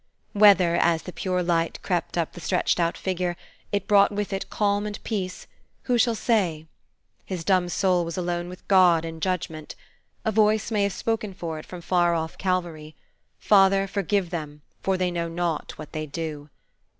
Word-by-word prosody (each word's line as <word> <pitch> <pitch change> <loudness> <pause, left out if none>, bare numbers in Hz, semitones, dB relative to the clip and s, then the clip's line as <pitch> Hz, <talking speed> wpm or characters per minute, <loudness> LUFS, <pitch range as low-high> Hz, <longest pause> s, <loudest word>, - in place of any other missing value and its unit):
Whether, 195 -5 +6
as 165 -1 +2
the 180 - -8
pure 180 -1 -1
light 170 -1 0
crept 175 -2 -2
up 165 -2 -1
the 175 - -10
stretched 180 +1 +1
out 170 0 +1
figure, 180 -2 -2 0.3
it 200 -1 -1
brought 200 -1 +5
with 205 0 -3
It 195 - -4
calm 205 0 0
and 210 0 -5
peace, 190 -5 -4 0.4
who 245 -2 +1
shall 235 -1 +3
say? 185 -10 0 0.6
His 180 -4 -5
dumb 185 -1 +2
soul 180 -1 +2
was 165 +1 -5
alone 175 -1 -2
with 180 - -12
God 180 -4 +5
in 165 0 -7
judgment. 160 -3 -3 0.5
A 220 - +2
Voice 215 +1 +2
may 210 -2 +1
have 200 -1 +1
spoken 215 -3 -2
for 165 -3 -5
it - - -12
from 180 -1 -8
far 175 -1 +2
off 160 0 -3
Calvary, 170 -5 -2 0.4
"Father, 195 -1 +4
forgive 195 -2 -1
them, 150 -4 -6 0.2
for 190 -1 0
they 180 -1 0
know 170 -1 -2
not 170 -1 -3
what 155 - -9
they 155 0 -4
do!" 150 0 -5
180 Hz, 180 wpm, -25 LUFS, 165-200 Hz, 0.6 s, Whether